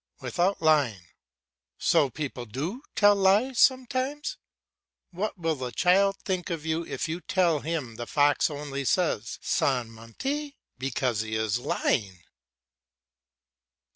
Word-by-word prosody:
"Without 180 0 0
lying." 135 - +3 0.7
So 140 - +3
people 130 -3 -5
do 155 - -4
tell 205 -1 +6
lies 205 +6 +3
sometimes. 260 +4 +1 0.7
What 195 +4 -3
will 165 -2 0
the 130 -4 -5
child 195 +6 +3
think 185 -2 -2
of 165 -3 -4
you 160 +1 0
if 175 - -4
you 165 +3 -4
tell 175 -5 +2
him 145 -8 -4
the 120 -1 -5
fox 145 +1 +3
only 145 -2 -5
says 135 - 0
"Sans 125 -4 0
mentir" 270 - -5 0.3
because 125 -4 -1
he 110 0 -4
is 110 +1 0
lying? 95 -7 -1
155 Hz, 125 wpm, -27 LUFS, 125-195 Hz, 0.7 s, tell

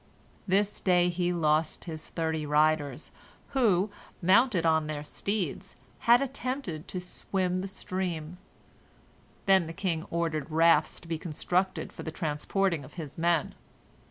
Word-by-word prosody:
This 200 +2 +1
day 180 -1 +4
he 175 0 0
lost 155 -2 +1
his 160 -3 -6
thirty 160 -2 -1
riders, 150 -1 +1 0.4
who, 215 -7 +2 0.3
mounted 190 0 +4
on 160 -1 +3
their 150 -1 -4
steeds, 195 +1 -3 0.3
had 240 +3 +7
attempted 255 - -4
to 185 - -4
swim 180 0 -2
the 195 - -4
stream. 180 -3 -4 1.1
Then 190 -4 +4
the 165 - -6
king 165 -2 -2
ordered 165 -2 -1
rafts 160 -1 +4
to - - -14
be 165 -1 -2
constructed 180 +3 -1
for - - -8
the - - -4
transporting 160 +2 -1
of 130 - -13
his 155 -5 -7
men. 170 -2 +2
170 Hz, 135 wpm, -29 LUFS, 155-190 Hz, 1.1 s, had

